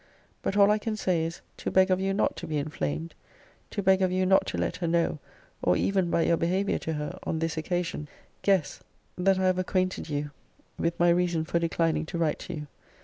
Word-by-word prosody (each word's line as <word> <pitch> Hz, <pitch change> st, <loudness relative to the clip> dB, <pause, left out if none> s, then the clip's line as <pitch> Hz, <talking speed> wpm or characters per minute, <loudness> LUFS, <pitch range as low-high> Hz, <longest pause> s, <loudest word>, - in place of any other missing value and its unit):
But 195 Hz, -, -1 dB
all 200 Hz, 0 st, +6 dB
I 210 Hz, -, +2 dB
can 220 Hz, +1 st, -2 dB
say 175 Hz, -5 st, +1 dB
is, 165 Hz, +1 st, -6 dB, 0.2 s
to -, -, -3 dB
beg 190 Hz, 0 st, +4 dB
of 185 Hz, -, +3 dB
you 195 Hz, 0 st, 0 dB
not 195 Hz, -, +1 dB
to 170 Hz, -, -6 dB
be 155 Hz, -1 st, -1 dB
inflamed: 80 Hz, -, -3 dB, 0.6 s
to 200 Hz, -, -3 dB
beg 190 Hz, 0 st, +4 dB
of 185 Hz, -1 st, +2 dB
you 185 Hz, 0 st, +1 dB
not 190 Hz, +1 st, +4 dB
to -, -, -3 dB
let 170 Hz, -, -1 dB
her 175 Hz, -2 st, -2 dB
know, 170 Hz, -2 st, +1 dB, 0.4 s
or 90 Hz, 0 st, +3 dB
even 190 Hz, -3 st, +1 dB
by 170 Hz, -, +2 dB
your 170 Hz, -, +3 dB
behaviour 185 Hz, +5 st, 0 dB
to 160 Hz, -, -3 dB
her, 150 Hz, +5 st, -4 dB
on 160 Hz, -, -2 dB
this 165 Hz, 0 st, -1 dB
occasion, 170 Hz, -1 st, -2 dB, 0.3 s
guess, 190 Hz, -6 st, +1 dB, 0.4 s
that 190 Hz, +1 st, +3 dB
I 190 Hz, -, 0 dB
have 185 Hz, 0 st, +2 dB
acquainted 185 Hz, -2 st, -1 dB
you 145 Hz, 0 st, -2 dB, 0.5 s
with 170 Hz, 0 st, -1 dB
my 175 Hz, 0 st, +5 dB
reason 170 Hz, -2 st, +2 dB
for 170 Hz, -, 0 dB
declining 165 Hz, -2 st, 0 dB
to 170 Hz, -, -4 dB
write 165 Hz, -2 st, 0 dB
to 180 Hz, -, -6 dB
you. 150 Hz, -1 st, -6 dB
170 Hz, 220 wpm, -28 LUFS, 160-185 Hz, 0.6 s, all